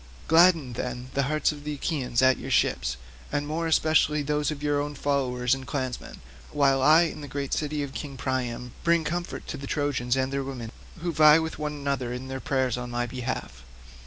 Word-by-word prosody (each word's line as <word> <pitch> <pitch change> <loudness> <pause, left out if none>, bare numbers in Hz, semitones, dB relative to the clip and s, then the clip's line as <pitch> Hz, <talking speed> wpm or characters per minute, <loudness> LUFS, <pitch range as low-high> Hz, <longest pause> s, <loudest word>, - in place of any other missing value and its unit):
Gladden, 165 -5 +5
then, 125 +1 -5
the 140 - +1
hearts 155 0 +2
of 145 -1 -9
the 150 0 -3
Achaeans 135 -5 -1
at 130 0 +4
your - - -6
ships, - - +1 0.3
and 145 - -1
more 160 +3 -2
especially 155 -2 +3
those 150 0 0
of 150 -1 -5
your 145 -1 +1
own 145 0 -4
followers 130 -3 0
and 135 -1 -4
clansmen, 130 -3 -4 0.3
while 135 -2 +3
I, 155 +5 +7
in 160 -2 -4
the 145 - -7
great 140 +1 -3
city 150 -1 -1
of 135 -1 -6
King 140 -3 -6
Priam, 125 -2 -3
bring 170 -1 +3
comfort 175 +3 -4
to 145 - -5
the 140 0 -7
Trojans 135 -4 0
and 130 +1 0
their 140 0 -1
women, 125 -4 -6 0.3
who 175 0 -1
vie 155 0 +7
with 160 -1 -3
one 150 0 -2
another 140 -4 -2
in 125 +2 -6
their 130 0 -4
prayers 130 -3 0
on 125 0 -5
my 120 0 -1
behalf. 120 - -5
140 Hz, 205 wpm, -26 LUFS, 130-150 Hz, 0.3 s, I